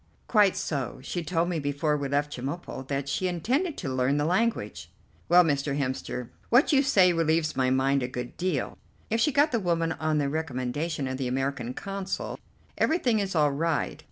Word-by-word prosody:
"Quite 205 -4 +4
so; 135 -3 -3
she 175 +5 -3
told 165 +2 0
me 170 -3 -1
before 145 +1 0
we 145 -1 -2
left 145 +1 0
Chemulpo 130 0 -5
that 140 0 -2
she 185 +6 -1
intended 260 - -1
to 135 -7 -3
learn 130 +2 +1
the 145 - +1
language." 225 +8 -1 0.4
"Well, 180 +1 +7
Mr. 140 -3 0
Hemster, 130 -3 -3 0.2
what 250 +6 +4
you 275 - +6
say 190 -10 +4
relieves 160 -1 +1
my 130 -1 +2
mind 135 +1 +2
a 125 - -1
good 125 -1 -6
deal. 175 -8 -2 0.3
If 225 - +2
she 300 - +3
got 290 +3 +3
the 235 - +1
woman 165 -3 0
on 155 -1 -1
the 145 -2 +1
recommendation 145 0 -2
of 130 0 -3
the 130 - -1
American 130 -1 -2
Consul, 195 -1 -4 0.4
everything 255 -9 +2
is 195 -2 -2
all 150 -2 +4
right. 160 +2 -1
155 Hz, 185 wpm, -27 LUFS, 135-185 Hz, 0.4 s, Well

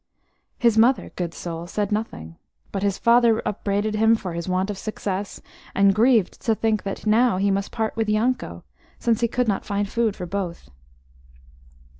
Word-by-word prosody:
His 230 -3 +3
mother, 245 +4 +3
good 175 -2 -3
soul, 170 0 -6
said 205 +2 -2
nothing, 85 - -4 0.3
but 195 - -3
his 200 -1 0
father 235 -1 +4
upbraided 205 +1 -1
him 220 +1 +4
for 185 -6 -5
his 170 +2 -4
want 185 +2 0
of 200 - -6
success, 200 -2 -4 0.3
and 195 0 +5
grieved 225 -2 +2
to 225 - +1
think 220 -1 0
that 195 +2 -6
now 225 0 +3
he 200 +1 +2
must 195 0 -1
part 220 -2 -2
with 220 -1 -1
Yanko, 235 +5 -1 0.3
since 230 -1 0
he 235 - +3
could 250 +1 -1
not 200 -3 0
find 200 0 -2
food 225 -1 0
for 180 - -6
both. 175 - -5
210 Hz, 175 wpm, -23 LUFS, 195-225 Hz, 0.3 s, and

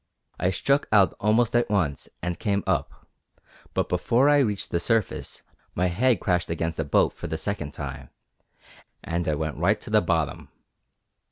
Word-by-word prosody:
I 90 - +2
struck 140 +10 +1
out 100 -3 +5
almost 110 +3 +2
at 120 -1 +2
once 80 -10 -1
and 90 -1 -3
came 100 -2 0
up, 85 -7 -2 0.7
but - - +1
before 130 +5 +2
I 145 0 +5
reached 105 -7 -1
the 85 - +1
surface 115 +2 -1 0.3
my 90 +1 +1
head 115 +6 +2
crashed 90 -2 0
against 80 -1 -2
a - - +1
boat - - +2
for - - -7
the 80 - -3
second 80 -3 -4
time, 70 -3 -7 0.9
and 85 +1 -2
I 75 - +1
went 75 0 -3
right 100 +6 +2
to 105 - -9
the 105 -1 +5
bottom. 80 -8 -1
90 Hz, 170 wpm, -25 LUFS, 80-110 Hz, 0.9 s, out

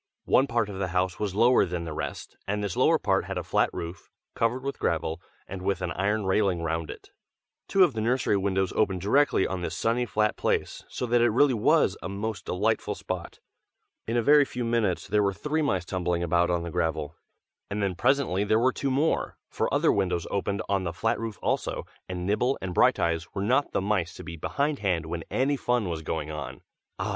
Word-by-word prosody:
One 135 - +4
part 115 -3 0
of 100 -2 -7
the 95 - 0
house 90 0 0
was 100 -3 -2
lower 120 +4 +5
than 90 -2 -3
the 80 - -5
rest, - - -5
and 105 +1 -1
this 100 -4 -2
lower - - +4
part - - +1
had - - -4
a - - -2
flat - - +2
roof, 85 +2 -7 0.2
covered 120 +3 0
with 140 0 -4
gravel, 80 +1 -1 0.3
and 95 -1 -6
with 95 -1 0
an 90 - -1
iron 100 +4 0
railing 95 -3 +1
round 80 -1 -2
it. - - -10 0.6
Two 195 - +5
of 170 -7 +3
the 110 - -2
nursery 120 -1 +1
windows 95 -1 0
opened 95 -4 +1
directly 135 +3 +3
on 95 -1 -3
this 85 -1 -4
sunny 120 +2 +1
flat 105 -1 +1
place, - - -1
so - - -4
that 120 0 +2
it 120 - +5
really 130 +4 +4
was 110 - +3
a - - -5
most 100 0 -4
delightful 105 +5 0
spot. - - -6 0.7
In 115 +2 0
a 120 - +2
very 145 +3 +6
few 125 -2 -4
minutes 115 -7 0
there 105 +1 +2
were 100 -1 +1
three 150 +6 -1
mice 95 - 0
tumbling 90 -1 -1
about 85 +1 +2
on 85 -1 0
the 85 - -5
gravel, 80 -2 -2 0.5
and 100 0 -2
then 95 -2 0
presently 120 -1 +1
there 110 +1 +2
were 125 +3 +3
two 140 - -2
more, 145 +5 0
for - - -1
other - - +3
windows 90 -4 0
opened 100 0 -1
on 95 -1 0
the 85 -2 -3
flat 110 +6 0
roof 115 -2 -5
also, - - -1 0.2
and 90 -1 -4
Nibble 120 +7 +1
and 95 -1 -4
Brighteyes 85 -1 +2
were 100 - -1
not 130 +7 +2
the - - 0
mice 95 -4 -1
to - - -9
be 85 -1 -7
behindhand 100 - -1
when 85 0 -4
any 135 +3 +1
fun 120 -7 0
was 80 -2 -3
going 80 -1 -3
on. 70 -4 -6 0.4
Ah! - - -2
100 Hz, 215 wpm, -27 LUFS, 90-115 Hz, 0.7 s, very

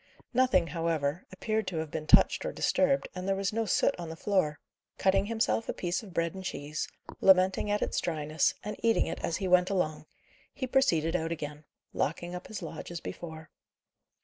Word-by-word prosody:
Nothing, 250 -8 +4
however, 165 -2 -1
appeared 215 +2 -2
to 175 - -3
have 160 -1 -3
been 155 -1 -4
touched - - +6
or - - -2
disturbed, 275 0 +2
and 185 +1 -5
there 195 - +2
was 195 0 -1
no 225 +1 0
soot - - +3
on 170 -2 -5
the 160 - -6
floor. 165 -4 0 0.4
Cutting 195 +1 +2
himself 225 0 0
a - - 0
piece 175 0 -2
of 210 -4 -11
bread 170 -1 0
and 190 0 -7
cheese, 150 -3 -4 0.3
lamenting 190 +1 +4
at 205 0 +1
its - - -1
dryness, 155 -2 0
and 210 - -4
eating 230 -1 +3
it - - -4
as 165 - -1
he 190 - -2
went 180 0 +4
along, 155 -6 -1 0.5
he 260 - -2
proceeded 180 - +2
out 165 -1 -1
again, 150 -2 -5 0.3
locking 175 +4 -2
up 180 0 -6
his 220 - -6
lodge - - -7
as 170 -1 -5
before. 160 -2 -8
180 Hz, 195 wpm, -30 LUFS, 160-200 Hz, 0.5 s, touched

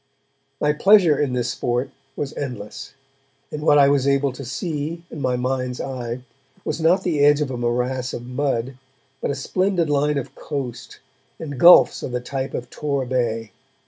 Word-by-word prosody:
My 150 0 +2
pleasure 185 -1 +5
in 140 -4 0
this 120 -1 -1
sport 125 +1 -2 0.2
was 145 -1 -4
endless, 125 -7 -6 0.6
and 150 - -5
what 150 -1 +4
I 140 -1 +6
was 140 -1 +2
able 140 0 +2
to 130 +2 -9
see, 155 +5 -4
in 150 - -7
my 130 -1 +1
mind's 125 0 -2
eye, 125 -2 -5 0.4
was 160 - -3
not 180 +4 +3
the 165 -5 0
edge 145 0 +5
of 145 -3 -1
a - - -3
morass 125 +1 -1
of 120 - -6
mud, 130 -1 -2 0.4
but - - -1
a 140 - -1
splendid 175 +2 0
line 145 +1 +1
of 135 - -5
coast, 135 -5 -6 0.4
and 145 -5 -6
gulfs 175 +5 +7
of 125 - -5
the 125 - 0
type 130 +2 -4
of 125 - -5
Tor 140 -3 -2
Bay. 115 -4 -1
135 Hz, 175 wpm, -22 LUFS, 125-150 Hz, 0.6 s, gulfs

